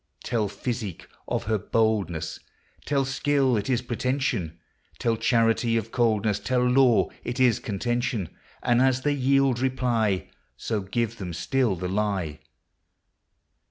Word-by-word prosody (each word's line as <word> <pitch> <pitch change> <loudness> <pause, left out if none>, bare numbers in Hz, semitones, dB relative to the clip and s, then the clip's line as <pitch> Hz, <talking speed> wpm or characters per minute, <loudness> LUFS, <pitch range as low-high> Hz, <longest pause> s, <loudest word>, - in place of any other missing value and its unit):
Tell 110 -4 0
physicke 110 -4 -4 0.2
of - - -1
her 110 0 0
boldnesse; 95 -8 0 0.5
Tell 140 -1 +1
skill 135 -1 +1
it 105 +3 -2
is 125 -1 +1
pretension; 120 - -1 0.4
Tell 115 -1 +1
charity 115 0 +2
of 110 - -3
coldnesse; 110 -4 +1
Tell 125 -1 +1
law 125 -2 +4
it 120 +2 -4
is 125 -4 +4
contention; 115 -2 -2 0.3
And 120 0 +3
as 130 0 +2
they 145 - +2
yield 135 -2 +2
reply, 120 -6 0 0.3
So 110 -3 -2
give 115 +4 -2
them 90 -3 -5
still 125 +3 0
the 90 +1 -4
lye. 95 -6 -1
115 Hz, 130 wpm, -26 LUFS, 105-130 Hz, 0.5 s, law